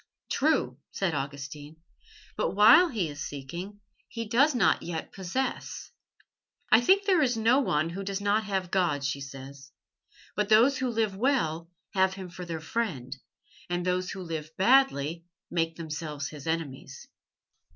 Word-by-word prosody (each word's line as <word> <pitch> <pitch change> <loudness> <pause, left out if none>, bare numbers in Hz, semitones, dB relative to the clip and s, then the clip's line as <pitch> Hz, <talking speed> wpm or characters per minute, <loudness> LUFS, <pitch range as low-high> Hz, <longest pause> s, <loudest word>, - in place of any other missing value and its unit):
"True," - - +1
said 190 -4 -1
Augustine, 145 +2 -5 0.6
"but 180 - -1
while 230 - +8
he 210 - -1
is 145 0 -8
seeking 175 +10 -7 0.3
he 230 -1 -5
does 260 +6 +3
not 230 - +3
yet 165 -2 -5
possess." 195 +8 -4 0.8
"I 220 - +7
think 390 +9 +4
there 370 -5 +4
is 250 -5 +2
no 230 +4 +4
one 165 - 0
who 195 +3 -5
does 195 0 -3
not 205 +2 +1
have 190 -3 -2
God," 170 -7 +1
she 140 0 -2
said. 135 0 -8 0.8
"But 210 -1 0
those 235 +6 +5
who 260 -1 0
live 220 -4 0
well 190 - 0 0.2
have 190 0 +2
Him 185 -2 -8
for 180 +1 -8
their 165 -2 -4
friend, 155 - -3 0.5
and 175 0 -1
those 180 0 0
who 190 -1 -6
live 160 -3 -5
badly 180 - +3 0.3
make 165 -1 0
themselves 150 -3 -5
His 150 -1 -10
enemies. 160 -5 -4
180 Hz, 150 wpm, -28 LUFS, 155-220 Hz, 0.8 s, while